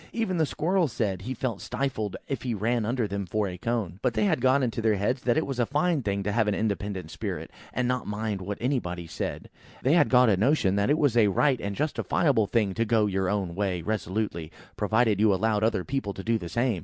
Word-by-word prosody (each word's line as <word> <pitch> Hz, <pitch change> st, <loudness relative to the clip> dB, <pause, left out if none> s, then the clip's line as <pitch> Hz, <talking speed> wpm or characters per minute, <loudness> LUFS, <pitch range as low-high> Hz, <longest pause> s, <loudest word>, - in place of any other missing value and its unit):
Even 225 Hz, -6 st, -1 dB
the 160 Hz, -2 st, +2 dB
squirrel 175 Hz, +4 st, +1 dB
said 100 Hz, -7 st, -2 dB
he 125 Hz, +7 st, -4 dB
felt 120 Hz, -5 st, -3 dB
stifled 110 Hz, -8 st, -3 dB
if 135 Hz, -4 st, -3 dB
he 120 Hz, -3 st, -2 dB
ran 115 Hz, +2 st, 0 dB
under 120 Hz, -2 st, 0 dB
them 100 Hz, -1 st, -4 dB
for 105 Hz, +3 st, 0 dB
a 90 Hz, -, -5 dB
cone. 110 Hz, -5 st, -3 dB
But 125 Hz, -3 st, 0 dB
they 110 Hz, -, +2 dB
had 120 Hz, -, +1 dB
got 130 Hz, +2 st, +4 dB
into 115 Hz, -2 st, -1 dB
their 110 Hz, -1 st, +3 dB
heads 115 Hz, +7 st, 0 dB
that 120 Hz, +2 st, +1 dB
it 160 Hz, -, +1 dB
was 135 Hz, -3 st, -4 dB
a 120 Hz, -, +3 dB
fine 150 Hz, +2 st, +1 dB
thing 100 Hz, -3 st, -1 dB
to 105 Hz, -, -1 dB
have 110 Hz, 0 st, +2 dB
an 105 Hz, -, +1 dB
independent 100 Hz, -5 st, -2 dB
spirit, -, -, -5 dB, 0.2 s
and 125 Hz, -1 st, -1 dB
not 125 Hz, -1 st, -1 dB
mind 105 Hz, -1 st, -3 dB
what 100 Hz, +2 st, -4 dB
anybody 90 Hz, -10 st, -2 dB
said; 80 Hz, -, -4 dB, 0.4 s
and -, -, -23 dB
they 135 Hz, -, +3 dB
had 175 Hz, -, +4 dB
got 125 Hz, -1 st, +6 dB
a 100 Hz, -4 st, +3 dB
notion 105 Hz, -3 st, +2 dB
that 100 Hz, +3 st, +1 dB
it 150 Hz, -, +3 dB
was 145 Hz, -7 st, +2 dB
a 115 Hz, -3 st, +5 dB
right 130 Hz, +6 st, +2 dB
and 100 Hz, 0 st, -3 dB
justifiable 140 Hz, -, +1 dB
thing 105 Hz, -4 st, +1 dB
to 115 Hz, -, 0 dB
go 110 Hz, -1 st, +2 dB
your 95 Hz, -2 st, 0 dB
own 95 Hz, -4 st, -1 dB
way 95 Hz, -3 st, -1 dB
resolutely, 95 Hz, -5 st, -2 dB, 0.2 s
provided 110 Hz, 0 st, +2 dB
you 110 Hz, -1 st, +5 dB
allowed 105 Hz, +1 st, +1 dB
other 110 Hz, -4 st, +1 dB
people 130 Hz, -6 st, -3 dB
to 95 Hz, -, -7 dB
do 115 Hz, +1 st, +1 dB
the 85 Hz, -, -6 dB
same. 120 Hz, -3 st, 0 dB
110 Hz, 240 wpm, -27 LUFS, 100-125 Hz, 0.4 s, got